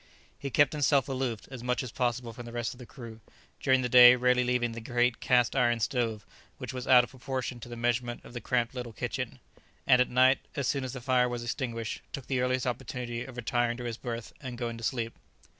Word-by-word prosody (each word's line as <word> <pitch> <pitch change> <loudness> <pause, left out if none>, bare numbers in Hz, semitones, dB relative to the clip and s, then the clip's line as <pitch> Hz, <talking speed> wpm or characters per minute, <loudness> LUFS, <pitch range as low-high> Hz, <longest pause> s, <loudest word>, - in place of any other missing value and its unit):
He 140 - -4
kept 145 +3 +3
himself 140 -3 +2
aloof 130 -5 -2
as 130 -3 -7
much 125 +1 -1
as 125 - -6
possible 120 -1 -1
from 120 +1 -9
the - - -8
rest 120 -1 -3
of 125 - -16
the 125 - -10
crew, 115 -3 -10 0.4
during 130 -1 +3
the - - +1
day 125 0 +9
rarely 125 0 +3
leaving 125 -1 +1
the 115 0 -7
great 120 +1 +1
cast 125 -1 +2
iron 120 -3 +3
stove, 115 -2 -1 0.3
which - - -6
was 125 -1 -5
out 125 -2 +8
of 120 - -8
proportion 130 -1 -4
to 120 - -10
the 120 - -6
measurement 120 0 -1
of - - -12
the 120 - -5
cramped 120 +2 0
little 125 -3 -6
kitchen; - - -4 0.5
and 125 0 +6
at 125 - +2
night, 130 +2 +5 0.2
as 140 -3 -1
soon 140 -2 0
as 130 - -5
the 125 - -6
fire 125 0 +2
was 120 -1 -4
extinguished, 120 -2 -3
took 140 - -5
the 130 -2 0
earliest 125 0 0
opportunity 120 -1 -3
of 130 -2 -11
retiring 120 0 0
to 125 - -6
his 115 -2 -4
berth 115 -2 -6
and 130 -3 -6
going 120 -1 -3
to - - -10
sleep. 115 -1 -2
125 Hz, 230 wpm, -29 LUFS, 120-130 Hz, 0.5 s, day